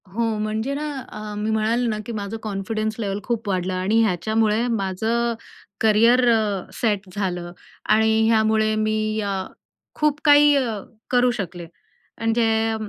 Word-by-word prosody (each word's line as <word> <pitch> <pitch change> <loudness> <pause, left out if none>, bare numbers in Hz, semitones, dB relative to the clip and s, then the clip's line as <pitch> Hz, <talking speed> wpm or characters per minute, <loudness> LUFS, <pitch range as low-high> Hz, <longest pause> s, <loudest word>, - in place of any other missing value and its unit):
हो, 225 +5 -2 0.2
म्हणजे 215 +5 -2
ना, 300 +2 -3 0.2
अ, 215 0 -7
मी 210 +1 -2
म्हणाले 225 +3 +1
ना, 215 -2 -1
की 235 - -6
माझं 210 0 -4
कॉन्फिडन्स 215 +1 -3
लेव्हल 200 -2 -2
खूप 230 -3 -3
वाढलं 185 -1 -1
आणि 195 +5 +2
ह्याच्यामुळे 220 +3 +1
माझं 225 +2 -1 0.5
करियर 230 +3 +4
अ, 210 -4 0
सेट 205 -5 -1
झालं 180 -3 -3 0.4
आणि 220 +1 +4
ह्यामुळे 220 -1 +3
मी 215 0 0
अ, 200 -1 -2 0.6
खूप 300 -1 0
काही 290 0 +7
अ, 235 -6 0 0.3
करू 245 0 +3
शकले. 175 -2 -7 0.5
म्हणजे, 225 -1 +1
220 Hz, 140 wpm, -22 LUFS, 205-230 Hz, 0.6 s, काही